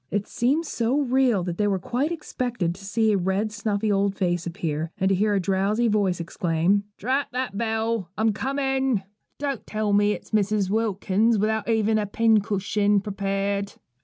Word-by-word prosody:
It 205 0 -1
seemed 270 +7 +1
so 245 -1 0
real 255 -7 +2
that 175 +1 -4
they 210 - +2
quite 260 - -1
expected 245 - -2
to 195 +3 -14
see 220 +2 +2
a 205 - +3
red, 190 +4 0
snuffy 210 0 -1
old 200 0 +1
face 175 -2 -1
appear, 165 -2 -3
and 190 - +1
to - - +3
hear 205 +2 +2
a - - +2
drowsy 195 +5 +1
voice 200 -5 +1
exclaim: 170 +4 0
'Drat 265 +6 0
that 250 -5 -2
bell: 225 -3 -1
I'm 220 +1 +3
a - - 0
coming. 265 -2 0 0.3
Don't 280 -4 -3
tell 215 -1 -1
me 205 +1 +4
it's - - -9
Mrs. 205 -2 +1
Wilkins, 215 0 +1
without 220 +2 0
even 220 -1 +2
a 210 - -2
pincushion 205 -1 +2
prepared.' 200 0 -2
210 Hz, 170 wpm, -24 LUFS, 195-230 Hz, 0.3 s, me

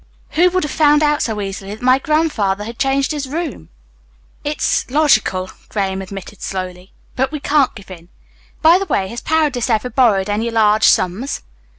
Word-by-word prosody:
Who 355 +3 +4
would 370 +1 0
have 300 - -3
found 300 -1 +4
out 295 0 +2
so 220 -3 -2
easily 195 +1 -5
that 220 - -15
my 255 +1 +4
grandfather 270 -11 0
had 230 +3 -8
changed 270 +1 +1
his 285 -3 -4
room?" 310 - -5 0.7
"It's 295 -3 -1
logical," 230 -10 +2 0.2
Graham 195 -2 -2
admitted 195 +1 -9
slowly, 185 -1 -6 0.2
"but 265 +1 0
we 305 - -4
can't 285 -1 +1
give 200 -2 -12
in. 170 -1 -12 0.5
By 335 +3 +6
the 390 - -2
way, 190 - 0
has 235 - -6
Paredes 295 -7 0
ever 230 +2 0
borrowed 210 -7 +3
any 215 +3 -1
large 215 -1 +3
sums?" 200 +10 +1
240 Hz, 175 wpm, -18 LUFS, 195-295 Hz, 0.7 s, By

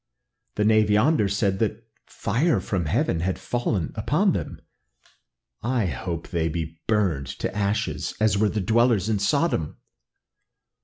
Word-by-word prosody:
The 105 - +1
knave 110 -1 +4
yonder 110 +3 +3
said 100 -1 0
that 110 0 -2 0.2
fire 140 +11 0
from 95 -4 -2
heaven 80 - +1
had 90 +2 -1
fallen 115 -8 -2
upon 155 - +1
them; - - -4 1.0
I 120 -2 0
hope 85 -1 -4
that - - -15
they 80 -2 0
be 80 0 -5
burned 95 - +1
to - - -3
ashes, 100 0 -1
as 110 -2 +3
were 105 +1 +2
the 105 - -2
dwellers 110 0 +2
in 105 -2 +1
Sodom." 140 - 0
105 Hz, 145 wpm, -24 LUFS, 90-115 Hz, 1.0 s, knave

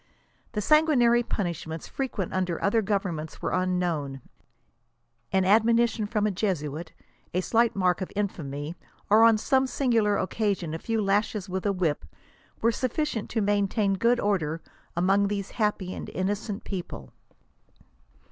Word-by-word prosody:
The 210 - -1
san 305 +8 +5
guinary 240 -5 +4
punishments 170 -7 -4
frequent 245 -9 -3
under 185 -3 -1
other 215 +3 +2
governments 185 -6 -2
were - - -2
wn 185 0 +1
knowni 145 -7 -2 1.1
An 190 -1 +2
admonition 225 +2 +3
from 210 -1 0
a 215 - +2
Jesutt, 170 -5 -2 0.4
a 180 - +2
slight 230 +4 +2
mark 185 -1 +1
of 185 - -4
infamy, 155 -7 -3 0.4
or 220 +2 +7
on 230 -1 +6
some 265 +4 +2
singular 230 -5 +2
occasion 190 -4 -1
a 160 - -3
few 225 +2 -1
lashes 205 0 0
with 190 +2 -2
a - - +3
whip, 175 - -1 0.6
were 230 - +4
suffi 255 +5 -1 0.2
cient - - -10
to 225 - -1
maintain 205 0 +1
good 235 +5 +2
order 165 -6 0 0.4
among 195 +3 +3
these 200 -1 -3
innocent 210 -2 +1 0.3
and 185 +1 0
happy 205 0 -3
people." 175 - -6
200 Hz, 145 wpm, -27 LUFS, 180-225 Hz, 1.1 s, or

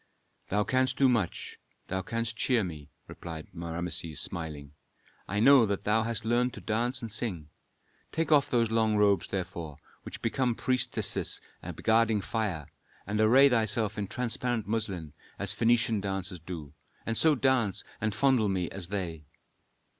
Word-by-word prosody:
"Thou 105 +2 +2
canst 130 0 +1
do 135 - +5
much. 115 -8 -1 0.3
Thou 95 +1 -2
canst 115 +3 -2
cheer 120 -1 +2
me," 75 -5 -7 0.2
replied 80 -2 -8
Rameses, 85 -2 -3
smiling. 75 -4 -5 0.6
"I 100 +2 -1
know 130 0 +7
that 100 -1 -2
thou 110 +2 +3
hast 115 0 -2
learned 120 +2 +1
to - - -8
dance 120 +3 -1
and 115 - -5
sing. 95 -9 -3 0.6
Take 160 0 -1
off 145 -2 +5
those 115 -2 +2
long 110 -1 +2
robes, 100 -3 +3
therefore, 85 -5 -5 0.2
which - - -8
become 120 +1 +1
priestesses 130 +2 -1 0.4
guarding 115 -1 +3
fire, 95 -8 -2 0.4
and 105 +2 -1
array 130 +6 +7
thyself 110 -3 +2
in 100 -2 -3
transparent 120 0 -1
muslin, 100 -9 -1 0.2
as 100 0 0
Phœnician 115 -2 +2
dancers 95 -2 -3
do. 80 -4 -8 0.3
And 115 - -1
so 155 +5 +4
dance 130 -7 +1 0.2
and 110 -1 -1
fondle 130 -5 +3
me 90 -3 -1
as 95 -3 -3
they." 85 -6 -4
110 Hz, 150 wpm, -29 LUFS, 90-120 Hz, 0.6 s, know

